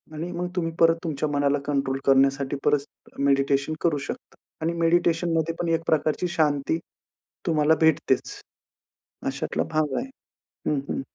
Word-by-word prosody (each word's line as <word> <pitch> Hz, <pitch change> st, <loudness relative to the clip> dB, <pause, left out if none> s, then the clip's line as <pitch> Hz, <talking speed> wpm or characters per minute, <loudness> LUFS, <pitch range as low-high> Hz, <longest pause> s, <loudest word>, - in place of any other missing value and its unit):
आणि 165 Hz, +3 st, -4 dB
मग 180 Hz, +1 st, -3 dB
तुम्ही 165 Hz, -2 st, -1 dB
परत 165 Hz, 0 st, +6 dB
तुमच्या 155 Hz, -2 st, -2 dB
मनाला 145 Hz, 0 st, +1 dB
कंट्रोल 135 Hz, -2 st, 0 dB
करण्यासाठी, 135 Hz, 0 st, +3 dB
परत 145 Hz, 0 st, -2 dB
मेडिटेशन 140 Hz, +2 st, +2 dB
करू 165 Hz, -4 st, +2 dB
शकता -, -, -7 dB, 0.3 s
आणि 165 Hz, +2 st, 0 dB
मेडिटेशन 170 Hz, 0 st, +2 dB
मध्ये 160 Hz, +1 st, 0 dB
पण 170 Hz, -, -1 dB
एक 165 Hz, -, +1 dB
प्रकारची 155 Hz, +3 st, +1 dB
शांती 150 Hz, 0 st, +2 dB, 0.7 s
तुम्हाला 160 Hz, -2 st, +3 dB
भेटतेच. 160 Hz, -1 st, +2 dB, 0.9 s
अशातला -, -, -1 dB
भाग 150 Hz, -3 st, +1 dB
आहे. 265 Hz, -, -3 dB, 0.6 s
हं, 150 Hz, -, +1 dB
हं. -, -, -2 dB
155 Hz, 140 wpm, -25 LUFS, 140-165 Hz, 0.9 s, परत